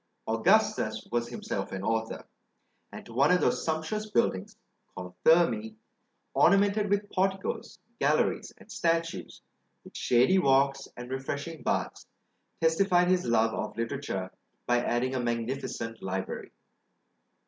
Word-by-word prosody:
Augustus - - +2
was 120 0 -1
himself 120 - -4
an 95 0 -5
author; 110 +1 -2 0.7
and - - -9
to 115 - -12
one 135 +5 +4
of 180 0 +4
those - - +1
sumptuous 160 +7 -2
buildings, 95 - 0 0.4
called 90 0 -7
Thermæ, 115 -10 +3 0.6
ornamented 200 +2 +4
with 205 0 0
porticos, 195 - -2 0.2
galleries, - - +1
and - - -16
statues, 165 0 -2 0.4
with - - -15
shady 125 +10 +3
walks, 135 -3 +2
and 120 +1 -8
refreshing 140 +4 -4
baths, - - -2 0.5
testified 180 +2 +3
his 185 -1 +2
love 115 -1 +2
of - - -4
literature 115 -6 -3 0.3
by 120 0 +2
adding 125 +2 0
a 130 - -1
magnificent 115 -1 -3
library. 95 0 -4
135 Hz, 125 wpm, -29 LUFS, 115-175 Hz, 0.7 s, one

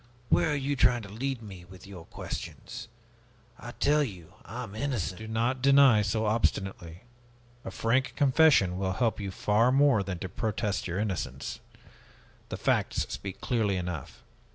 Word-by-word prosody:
Where - - +3
are - - +1
you 140 0 -1
trying 120 -3 +3
to 100 - -9
lead 125 +3 -3
me, 95 -4 -10
with 95 +2 -14
your 95 -4 -10
questions? - - -7 0.7
I 120 - -8
tell 150 +1 +2
you, 90 - -8
I 120 +6 -6
am 105 -4 -9
innocent!" 110 -6 -2
"Do 110 - -7
not 120 +4 -1
deny 135 -4 +6
so 105 +2 0
obstinately. 95 -5 -1 0.6
A - - -5
frank 115 +7 0
confession 135 - +4
will 95 -1 -1
help 115 -1 0
you 100 -2 -4
far 105 +5 +2
more 135 -5 +4
than 95 -2 -4
to 95 - -5
protest 105 +2 -2
your 90 +1 -3
innocence. 100 -3 -3 0.9
The - - -4
facts - - 0
speak 100 -1 -6
clearly 110 -6 0
enough. 90 -4 -6
110 Hz, 160 wpm, -28 LUFS, 95-130 Hz, 0.9 s, deny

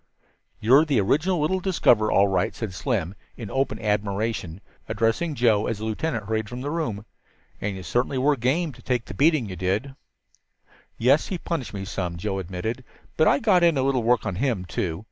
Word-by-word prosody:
"You're 130 +7 +6
the 145 -7 +1
original 155 - +1
little 180 +6 +1
discoverer, 125 - +3
all 100 +1 +4
right," 95 - 0
said 110 -5 -5
Slim 90 0 -2 0.2
in 110 -5 -7
open 135 -5 -1
admiration, 105 -4 -2 0.3
addressing 115 +9 0
Joe 110 -4 +3
as 115 - -2
the 110 - -5
lieutenant 110 0 -2
hurried 110 0 -2
from 125 +1 -6
the 145 +2 -3
room. 115 -11 -3 0.6
"And 100 -1 -2
you 95 - -7
certainly 125 +6 0
were 145 +3 +3
game, 140 +7 0
to 125 - -16
take 125 -3 -1
the - - -8
beating 145 - +3
you 95 - -6
did." 95 +10 -1 1.0
"Yes, 135 +6 +3
he 185 - -3
punished 165 -10 -4
me 95 0 -4
some," 90 -4 -4
Joe 95 +3 -2
admitted. 95 +7 -4 0.3
"But 155 - +3
I - - +5
got 205 -9 +3
in 170 -4 +4
a 130 - +1
little 135 -2 +1
work 115 0 +2
on 100 -4 -3
him, 115 -6 -1
too. 85 -2 -3
115 Hz, 195 wpm, -24 LUFS, 100-140 Hz, 1.0 s, You're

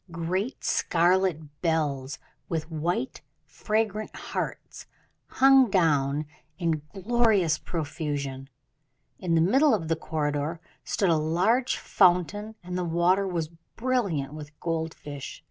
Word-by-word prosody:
Great 180 +8 -3
scarlet 170 -4 +1
bells, 145 -5 0 0.3
with 160 0 -3
white, 160 -3 -2 0.2
fragrant 215 +8 -2
hearts, - - -5 0.4
hung 270 -2 +5
down 150 -5 +2 0.3
in 165 -4 0
glorious 205 -4 +2
profusion. 145 -4 -4 0.7
In 170 -2 0
the 165 - +4
middle 265 - +4
of 165 -6 -4
the 165 - +2
corridor 150 0 -2 0.2
stood 195 -4 +1
a - - +4
large 185 +11 +1
fountain, 200 +4 +2
and 180 0 -5
the 180 - -1
water 175 +3 +2
was 165 -4 -2 0.3
brilliant 200 - 0
with 150 -1 -10
gold 165 -1 -2
fish. 145 -2 -8
170 Hz, 115 wpm, -27 LUFS, 155-195 Hz, 0.7 s, hung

